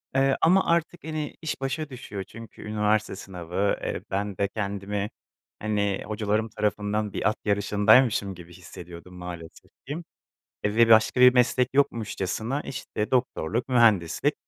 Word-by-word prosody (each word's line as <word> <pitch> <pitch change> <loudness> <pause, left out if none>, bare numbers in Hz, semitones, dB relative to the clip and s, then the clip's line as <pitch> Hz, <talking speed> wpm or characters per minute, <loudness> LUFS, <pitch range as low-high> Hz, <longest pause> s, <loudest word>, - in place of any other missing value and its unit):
Eee, 135 0 +3
ama 185 +4 +5
artık 170 0 0
hani 155 -1 -4
iş 160 -4 -4
başa 140 +3 -2
düşüyor 115 -6 -7
çünkü 115 +4 -12
üniversite 105 -1 0
sınavı, 95 +1 -2
eee, - - -3
ben 100 0 -2
de 100 - +1
kendimi 100 0 -3 0.5
hani 105 -2 -1
hocalarım 110 +1 -1
tarafından 105 0 -1
bir - - +1
at 110 - -2
yarışındaymışım 105 +1 +3
gibi 85 0 -13
hissediyordum 85 0 -11
maalesef 85 -2 -9 0.2
ki 145 - -3 0.7
ve 110 +3 +4
başka 110 +3 +5
bir 125 0 +9
meslek 125 0 +3
yokmuşçasına 115 0 0
işte 115 -5 -4
doktorluk, 120 -3 0
mühendislik, 110 -9 +3
105 Hz, 135 wpm, -26 LUFS, 100-125 Hz, 0.7 s, bir